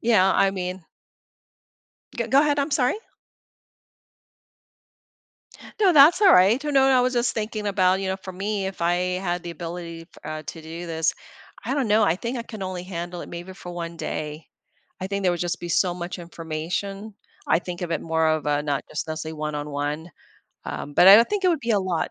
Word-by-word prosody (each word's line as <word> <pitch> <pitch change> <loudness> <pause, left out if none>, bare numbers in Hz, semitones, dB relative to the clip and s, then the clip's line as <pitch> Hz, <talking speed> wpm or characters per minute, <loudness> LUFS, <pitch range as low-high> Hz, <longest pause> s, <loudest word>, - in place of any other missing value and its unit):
Yeah, 210 -5 +4
I 195 - +4
mean 185 -2 -5 1.3
G - - -1
go 275 +2 +5
ahead. 295 -1 +2
I'm 285 +2 0
sorry. 255 -3 +2 2.9
No, 385 -4 +5
that's 305 +6 +7
all 395 - +7
right. 205 +9 +5
You 295 - -2
know, 270 -1 +5
I 265 -1 +5
was 255 +1 +1
just 240 0 +1
thinking 215 -1 -3
about, 190 -1 +2
you 195 - -2
know, 190 - -1
for 190 -1 -9
me, 195 +1 -2
if 190 -3 -6
I 175 +1 +3 0.3
had 175 -2 -2
the 170 - -6
ability 170 0 -7
f 165 - -18 0.2
uh, 155 0 -5
to 165 - -7
do 165 +2 -7
this, 160 -1 0 0.5
I 255 +6 -1
don't 270 -6 0
know. 215 +1 +4
I 170 - +2
think 235 +6 -4
I 235 - -3
can 215 -4 -8
only 185 -1 -4
handle 175 -1 -6
it - - -8
maybe 175 +2 -8
for 175 - -9
one 170 -1 -6
day. 150 0 -5 0.5
I 185 - -3
think 200 0 -3
there 180 -2 +3
would 175 - -4
just 175 0 -2
be 175 - -5
so 175 +1 +2
much 175 0 -6
information. 175 +5 -5 0.3
I - - +4
think 180 0 -7
of 170 - -4
it - - -1
more 160 -1 +1
of 155 -1 0
a 145 0 +1
not 145 -2 -2
just 155 - -4 0.3
one 150 0 -4
on 145 0 -4
one, 145 +4 -3 0.5
um, 145 - -6
but, 180 - +6
I 195 - +12
don't 230 +2 +5
think 410 -2 -2
it 365 - +5
would 330 -4 +1
be 235 - -3
a 205 - +3
lot. 185 -3 -1
180 Hz, 210 wpm, -24 LUFS, 165-215 Hz, 2.9 s, I